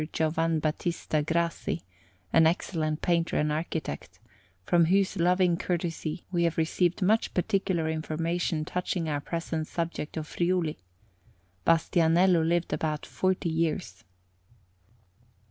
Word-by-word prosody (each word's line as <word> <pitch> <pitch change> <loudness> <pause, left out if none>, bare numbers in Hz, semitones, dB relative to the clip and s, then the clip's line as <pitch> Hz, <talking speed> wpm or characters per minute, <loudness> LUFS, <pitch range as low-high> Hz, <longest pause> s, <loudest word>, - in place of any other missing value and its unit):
Giovan 160 +1 +1
Battista 155 0 -1
Grassi, 170 +1 -1 0.5
an 165 -1 +6
excellent 160 -2 -1
painter 170 -1 +1
and 150 0 +1
architect, 150 - -4 0.5
from 170 - +4
whose 195 +4 +2
loving 180 -1 +3
courtesy 170 -1 -3
we 175 -2 +1
have 170 - 0
received 175 +3 +1
much 220 +4 +2
particular 190 -3 0
information 160 0 -1
touching 180 -1 -2
our 145 -2 -1
present 165 -1 -3
subject 165 -2 -4
of 155 - -3
Friuli. 170 -1 -1 0.9
Bastianello 165 +1 +4
lived 170 +1 0
about 155 -2 -2
forty 185 -2 0
years. 160 - -2
165 Hz, 110 wpm, -28 LUFS, 160-175 Hz, 0.9 s, an